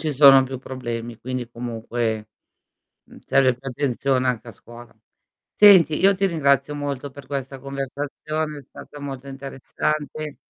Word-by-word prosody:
ci 155 -2 -1
sono 135 -1 +8
più 130 -1 -6
problemi, 120 -3 -6
quindi 125 -1 -5
comunque, 115 -2 -3 0.8
mhmm, - - -16
serve 130 -2 +4
più 130 +3 -8
attenzione 130 0 0
anche 120 -2 -2
a - - -9
scuola. 120 +3 -14 0.6
Senti, 185 -7 +7
io 195 +1 +5
ti 195 - 0
ringrazio 140 -4 +1
molto 140 -1 -4
per 140 0 -12
questa 135 -1 -5
conversazione, 145 +3 -4
è - - -11
stata 145 - -13
molto 140 -1 -7
interessante. 145 +2 -4
135 Hz, 145 wpm, -23 LUFS, 125-145 Hz, 0.8 s, sono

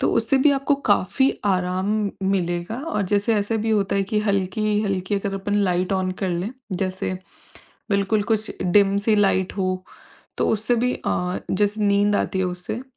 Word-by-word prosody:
तो - - +2
उससे 270 - +2
भी 285 +3 +5
आपको 280 +1 +2 0.2
काफ़ी 265 +7 +3
आराम 190 +2 0 0.2
मिलेगा 175 +2 -1
और 305 - 0
जैसे 205 +3 +2
ऐसे 205 +2 0
भी 220 +1 -1
होता 200 -2 +1
है 200 - +2
कि 210 - +3
हल्की-हल्की 200 0 0
अगर 195 0 -3
अपन 205 +1 -2 0.2
लाइट 180 +2 0
ऑन 185 -1 0
कर 190 - +1
लें 175 +5 -2 0.2
जैसे 185 0 -2 0.8
बिल्कुल 200 +1 +2
कुछ 220 0 -1
डिम 195 +2 +4
सी 215 - +4
लाइट 195 -2 +2
हो, 185 -1 -1 0.5
तो - - +1
उससे 220 +3 +1
भी 250 +2 +1
अ, 180 0 -1
जैसे 205 +2 0
नींद 205 0 +3
आती 190 - -1
है - - +1
उससे, 180 +6 -5
200 Hz, 170 wpm, -23 LUFS, 185-215 Hz, 0.8 s, भी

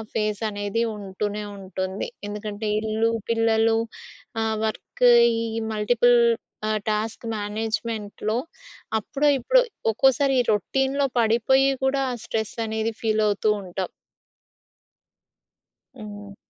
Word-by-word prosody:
Face 210 -1 -1
అనేది 205 +2 -1
ఉంటూనే 205 +1 -4
ఉంటుంది. 190 0 -4 0.2
ఎందుకంటే 210 +1 -4
ఇల్లు, 220 +1 +1 0.2
పిల్లలు, 225 0 +3 0.6
ఆహ్, 220 0 0
వర్క్, 220 +3 -2 0.3
ఈ - - -1 0.3
మల్టిపుల్ 240 +3 +4 0.5
ఆహ్, 215 0 +1
టాస్క్ 215 +2 -2
మేనేజ్మెంట్‌లో 215 0 -3 0.6
అప్పుడో, 280 +7 -1
ఇప్పుడో - - +4 0.3
ఒక్కోసారి 270 +4 +3
ఈ - - -1
రొటీన్‌లో 270 +7 +1
పడిపోయి 235 +4 +4 0.2
కూడా 275 +1 +2
ఆహ్, 245 - -5
స్ట్రెస్ 220 -1 -3
అనేది 220 +1 -1
ఫీలవుతుంటాం. 210 -4 0 2.2
హ్మ్. 205 -1 -9
220 Hz, 95 wpm, -24 LUFS, 210-230 Hz, 2.2 s, మల్టిపుల్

